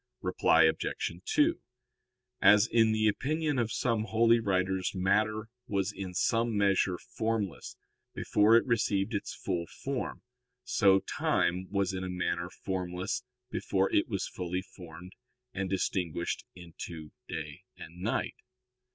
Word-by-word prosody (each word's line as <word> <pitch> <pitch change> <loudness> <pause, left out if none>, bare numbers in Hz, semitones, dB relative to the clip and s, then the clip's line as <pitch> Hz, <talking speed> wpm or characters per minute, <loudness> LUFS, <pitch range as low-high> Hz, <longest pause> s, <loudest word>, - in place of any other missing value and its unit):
Reply - - +4
Obj. - - 0
2: 335 -6 +2 0.8
As 105 +1 +7
in 115 -2 +3
the 110 0 +2
opinion 145 +5 0
of 115 -2 0
some 115 -3 0
holy 115 +1 +4
writers 95 -2 0
matter 110 +4 +1 0.2
was 100 0 0
in 95 -2 -6
some 115 +3 +1
measure 100 -2 +2
formless 110 -4 -3 0.4
before 105 +2 +4
it - - +2
received 110 -3 +1
its 100 - -3
full 85 -3 -3
form, 135 -2 -5 0.4
so 100 -5 +4
time 90 +1 0
was 100 -1 0
in 95 0 -3
a 90 - -4
manner 85 -1 -2
formless 90 -1 -3 0.3
before 95 0 0
it 100 - +3
was 100 -4 -2
fully 90 0 -4
formed 90 -1 -12 0.4
and 95 -2 -2
distinguished 90 -3 -1
into 85 -2 -9 0.2
day - - -6 0.2
and 85 +2 -11
night. 110 +5 -1
100 Hz, 130 wpm, -30 LUFS, 90-110 Hz, 0.8 s, As